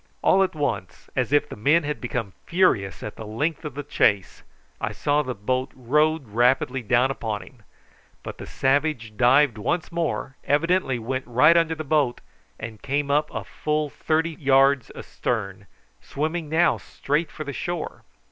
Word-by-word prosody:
All 195 - +5
at 190 -3 +1
once, 100 - -3
as 130 -1 0
if 145 0 +3
the - - -8
men 145 +10 +3
had 150 0 -3
become 115 -5 -3
furious 100 - +1
at 105 - -7
the 110 - -7
length 145 +9 -2
of 150 -4 -6
the 145 - -4
chase, 100 -8 +1 0.4
I 105 - -2
saw 145 +6 +1
the 130 -4 -4
boat 130 +6 -1
rowed 150 +3 +1
rapidly 125 +3 +2
down 125 +3 +2
upon 110 -5 -4
him; 125 - -17 0.6
but - - -8
the - - -8
savage 135 -5 0
dived 130 0 +4
once 165 - -1
more, 165 -5 -2
evidently 165 -2 +1
went 130 +3 -4
right 125 +7 +5
under 165 -1 +3
the 155 - -5
boat, 145 -4 +1 0.4
and 110 -1 -7
came 140 +1 -1
up 150 +1 +2 0.2
full 150 -1 -2
thirty 160 +4 0
yards 135 -3 +3
astern, 100 -4 -4 0.3
swimming 155 +2 -3
now 170 +2 +3
straight 150 +4 -2
for 155 - -7
the 140 -1 -6
shore. 175 +3 -4
140 Hz, 165 wpm, -24 LUFS, 120-155 Hz, 0.6 s, All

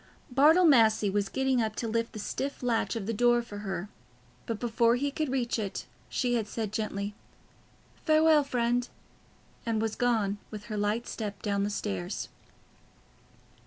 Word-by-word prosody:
Bartle 310 +8 +6
Massey 220 -8 +5
was 200 0 0
getting 265 -2 +1
up 215 -1 -2
to 235 - -3
lift 230 +1 -1
the - - -7
stiff 270 +6 -4
latch 235 -1 0
of 220 -4 -3
the 230 - -1
door 240 +2 +3
for 205 -3 -8
her, 195 -2 -4 0.6
but 225 -3 -2
before 235 0 +2
he 280 +3 -1
could 305 0 -2
reach 245 -3 0
it, 200 -3 -4 0.2
she 245 -2 0
had 225 -3 0
said 220 -1 -3
gently, 210 -2 -2 0.9
"Farewell, 310 -1 +5
friend," 245 -2 0 0.7
and 225 -2 0
was 220 0 -1
gone, 220 -5 +1
with 210 -1 -7
her 215 - -6
light 210 +3 0
step 205 -3 -5
down 200 -1 0
the 205 - 0
stairs. 95 - -3
230 Hz, 160 wpm, -29 LUFS, 210-245 Hz, 0.9 s, Bartle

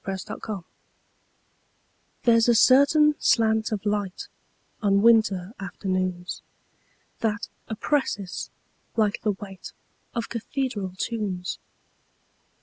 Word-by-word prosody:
Part 190 -1 -3
Two: - - -9
Nature - - -8
LXXXII 195 -4 -4 1.6
THERE'S 230 -1 +5
a 235 - +5
certain 290 +5 +6
slant 220 -1 +3
of 215 -1 -3
light, 205 -3 -2 0.5
On 200 -1 +3
winter 215 -4 +4
afternoons, 185 -2 -3 0.8
That 225 -1 -1 0.2
oppresses, 220 -5 -2 0.5
like 215 -3 +1
the 210 - +1
weightOf 195 +3 -9
cathedral 230 -5 -3
tunes. 195 -5 -3
210 Hz, 95 wpm, -25 LUFS, 190-230 Hz, 1.6 s, certain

